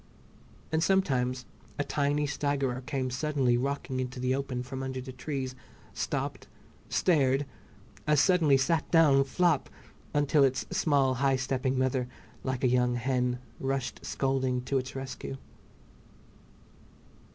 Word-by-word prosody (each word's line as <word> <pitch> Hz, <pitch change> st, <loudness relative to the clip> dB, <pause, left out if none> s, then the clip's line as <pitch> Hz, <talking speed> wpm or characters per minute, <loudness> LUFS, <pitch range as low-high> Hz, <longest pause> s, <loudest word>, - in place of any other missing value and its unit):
And 160 Hz, 0 st, +2 dB
sometimes 130 Hz, -10 st, +1 dB, 0.3 s
a 145 Hz, -, +1 dB
tiny 145 Hz, +1 st, 0 dB
staggerer 140 Hz, -3 st, -1 dB
came 130 Hz, -4 st, -1 dB
suddenly 130 Hz, -2 st, +1 dB
rocking 135 Hz, +1 st, -2 dB
into 125 Hz, 0 st, -4 dB
the 130 Hz, +1 st, +1 dB
open 130 Hz, -2 st, -2 dB
from 130 Hz, +1 st, -6 dB
under 130 Hz, -1 st, -3 dB
the 130 Hz, +1 st, -7 dB
trees, 130 Hz, -1 st, -4 dB, 0.4 s
stopped, -, -, -3 dB, 0.4 s
stared, 140 Hz, -5 st, +2 dB, 0.6 s
as 150 Hz, -1 st, +4 dB
suddenly 160 Hz, -5 st, +5 dB
sat 155 Hz, +5 st, +1 dB
down 150 Hz, -5 st, +5 dB
"flop," 165 Hz, +2 st, +1 dB, 0.4 s
until 145 Hz, 0 st, +3 dB
its 135 Hz, -1 st, +1 dB
small 140 Hz, -4 st, +2 dB
high 135 Hz, -1 st, +4 dB
stepping 130 Hz, 0 st, -1 dB
mother, 130 Hz, -1 st, +1 dB, 0.4 s
like 130 Hz, -1 st, -2 dB
a -, -, +5 dB
young 125 Hz, 0 st, +2 dB
hen, 125 Hz, 0 st, 0 dB, 0.2 s
rushed 135 Hz, -1 st, -2 dB
scolding 130 Hz, -2 st, 0 dB
to 135 Hz, +1 st, 0 dB
its 130 Hz, +1 st, -7 dB
rescue. 135 Hz, 0 st, -5 dB
135 Hz, 130 wpm, -29 LUFS, 130-145 Hz, 0.6 s, suddenly